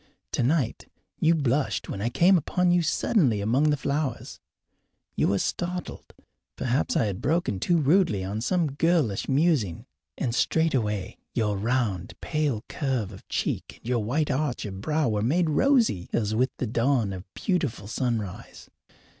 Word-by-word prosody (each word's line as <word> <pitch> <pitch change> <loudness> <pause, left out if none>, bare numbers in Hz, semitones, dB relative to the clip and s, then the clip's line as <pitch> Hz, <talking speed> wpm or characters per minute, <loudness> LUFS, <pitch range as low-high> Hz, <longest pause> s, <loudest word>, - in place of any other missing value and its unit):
Tonight 130 +1 0 0.3
you 165 +1 +4
blushed 140 -1 0
when 100 - -5
I 115 - 0
came 175 +10 +4
upon 180 +2 +1
you 175 0 +4
suddenly 155 - +2
among 125 +9 +2
the 145 - +2
flowers. 140 -2 -3 0.8
You - - +2
were 100 - +2
startled 180 - -4 0.4
perhaps 130 +6 0
I 130 - +2
had 100 -2 -3
broken 155 - 0
too 175 - +2
rudely 150 - +3
on 100 +3 -3
some 165 +4 +1
girlish 145 - +1
musing; 135 - +1 0.3
and 120 - -1
straightway 115 - 0 0.2
your 105 -3 +1
round, 105 -4 -1
pale 150 -8 -1
curve 130 -8 -2
of 95 - -13
cheek - - -2
and - - -14
your 120 -3 +1
white 145 +8 0
arch 135 -5 -1
of 95 -2 -6
brow 155 +3 +1
were 105 -2 0
made 155 +8 +2
rosy 230 - +2
as 110 -2 0
with 125 +4 +2
the - - -2
dawn 115 -2 +1
of 95 0 -9
beautiful 150 - -1
sunrise. 110 -5 -4
130 Hz, 155 wpm, -26 LUFS, 105-155 Hz, 0.8 s, you